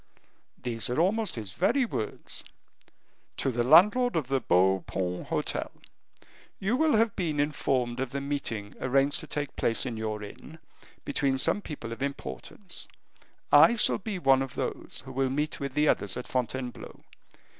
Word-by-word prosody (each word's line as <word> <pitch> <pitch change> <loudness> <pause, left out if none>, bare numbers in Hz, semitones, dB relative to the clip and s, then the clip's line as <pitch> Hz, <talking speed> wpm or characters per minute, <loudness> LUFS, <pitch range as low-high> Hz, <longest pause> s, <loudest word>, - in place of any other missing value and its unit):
"These 120 -2 -3
are 125 - 0
almost 210 +5 +1
his 105 -4 -6
very 260 - +2
words. 110 - -5 0.9
'To 135 - 0
the 120 0 0
landlord 210 - +6
of 150 -6 -1
the 135 -1 +2
Beau 95 +1 +3
Paon 90 -1 -3
Hotel, - - -2 0.9
You 205 +5 +1
will 310 0 +3
have 225 0 +2
been 160 -5 -1
informed 130 -4 0
of 130 -1 -1
the 140 - -3
meeting 135 -7 -4
arranged 135 +2 +2
to - - -8
take 145 -1 -3
place 115 - 0
in 120 -3 -4
your 110 -1 -3
inn 140 +9 -11 0.5
between 140 -1 0
some 205 - +2
people 140 - -7
of 115 - -7
importance; 140 - -5 0.6
I 160 +11 +8
shall 220 - +4
be 205 -1 -4
one 135 -6 +4
of 135 -1 -5
those - - -4
who 130 - -8
will 135 0 0
meet 150 +3 -2
with 140 -1 -4
the 150 +1 +3
others 100 -8 +1
at - - -6
Fontainebleau. 125 0 -4
135 Hz, 165 wpm, -28 LUFS, 120-155 Hz, 0.9 s, I